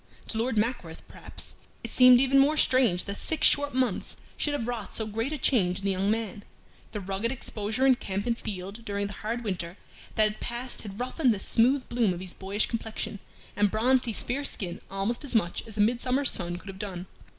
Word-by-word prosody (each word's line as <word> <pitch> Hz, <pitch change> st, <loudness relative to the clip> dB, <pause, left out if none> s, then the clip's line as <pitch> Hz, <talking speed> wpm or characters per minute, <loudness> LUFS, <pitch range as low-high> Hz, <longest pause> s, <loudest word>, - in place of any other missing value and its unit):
To 225 Hz, -, -1 dB
Lord 230 Hz, 0 st, 0 dB
Mackworth, 210 Hz, -7 st, -2 dB
perhaps, -, -, -6 dB, 0.3 s
it 230 Hz, -, -5 dB
seemed 250 Hz, -1 st, +8 dB
even 270 Hz, +1 st, +4 dB
more 295 Hz, +3 st, +4 dB
strange 250 Hz, -11 st, +3 dB
that 200 Hz, 0 st, -4 dB
six 320 Hz, -, 0 dB
short 285 Hz, -2 st, +3 dB
months 255 Hz, -7 st, 0 dB, 0.2 s
should 295 Hz, -, -1 dB
have 240 Hz, -5 st, -2 dB
wrought 230 Hz, -5 st, -4 dB
so 220 Hz, -, -1 dB
great 225 Hz, +5 st, -2 dB
a 305 Hz, -, -2 dB
change 195 Hz, -10 st, +2 dB
in 195 Hz, -, -5 dB
the 200 Hz, -, +2 dB
young 190 Hz, +1 st, 0 dB
man. 215 Hz, -2 st, -2 dB, 0.5 s
The 210 Hz, -, -4 dB
rugged 195 Hz, +4 st, -2 dB
exposure 225 Hz, -1 st, -1 dB
in 265 Hz, -, +7 dB
camp 200 Hz, -4 st, -3 dB
and 235 Hz, -1 st, +1 dB
field 200 Hz, +1 st, -6 dB
during 200 Hz, -2 st, -2 dB
the 200 Hz, -, -5 dB
hard 230 Hz, +4 st, -3 dB
winter 180 Hz, -3 st, -3 dB, 0.4 s
that 215 Hz, -, +5 dB
had 215 Hz, 0 st, +1 dB
passed 240 Hz, +1 st, -4 dB
had 205 Hz, 0 st, -8 dB
roughened 250 Hz, -1 st, +1 dB
the -, -, -6 dB
smooth 250 Hz, +6 st, +2 dB
bloom 230 Hz, -6 st, +1 dB
of -, -, -7 dB
his 185 Hz, -1 st, -5 dB
boyish 195 Hz, +2 st, -1 dB
complexion 220 Hz, -2 st, -4 dB, 0.4 s
and 205 Hz, 0 st, +3 dB
bronzed 250 Hz, +5 st, +3 dB
his 225 Hz, -, -1 dB
fair 270 Hz, +4 st, -2 dB
skin 185 Hz, -10 st, -2 dB
almost 195 Hz, +7 st, -1 dB
as 275 Hz, -4 st, -1 dB
much 205 Hz, 0 st, 0 dB
as 220 Hz, -1 st, -8 dB
a -, -, +3 dB
midsummer's 250 Hz, +5 st, +2 dB
sun 175 Hz, -1 st, -3 dB
could 195 Hz, -, -11 dB
have 190 Hz, 0 st, -9 dB
done. 190 Hz, -4 st, -5 dB
220 Hz, 215 wpm, -28 LUFS, 200-250 Hz, 0.5 s, seemed